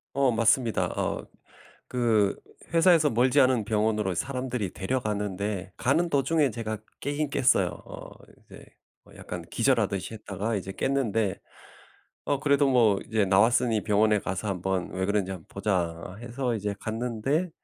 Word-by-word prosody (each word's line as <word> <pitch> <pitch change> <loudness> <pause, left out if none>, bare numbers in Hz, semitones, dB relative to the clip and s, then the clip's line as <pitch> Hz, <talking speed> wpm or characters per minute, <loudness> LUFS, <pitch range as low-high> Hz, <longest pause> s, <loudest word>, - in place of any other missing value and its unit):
어 135 -2 +3
맞습니다. 115 +1 +2
어 - - -2 0.6
그 115 -5 +2 0.4
회사에서 165 -2 +5
멀지 125 +5 +3
않은 130 -4 +3
병원으로 105 -3 0
사람들이 125 -1 -3
데려갔는데 100 -3 -2
가는 160 +7 +1
도중에 145 0 +2
제가 110 -2 -4 0.2
깨기는 145 +1 -2
깼어요. 125 -11 +3
어 - - -10 0.3
이제 - - -15 0.4
뭐 - - -18
약간 - - -7
기절하듯이 100 +3 0
했다가 105 +1 -3
이제 95 0 -5
깼는데 115 -8 0 0.9
어 140 - 0
그래도 140 -1 +3
뭐 110 -6 +4
이제 110 -2 +1
나왔으니 110 +3 +3
병원에 105 -1 +3
가서 90 +3 -4
한번 95 -1 -2
왜 95 0 -2
그런지 100 -2 0
한번 90 -4 -9
보자 90 -3 -2
해서 120 0 -2
이제 105 -1 -2
갔는데 125 +9 -1
110 Hz, 315 characters per minute, -27 LUFS, 100-130 Hz, 0.9 s, 회사에서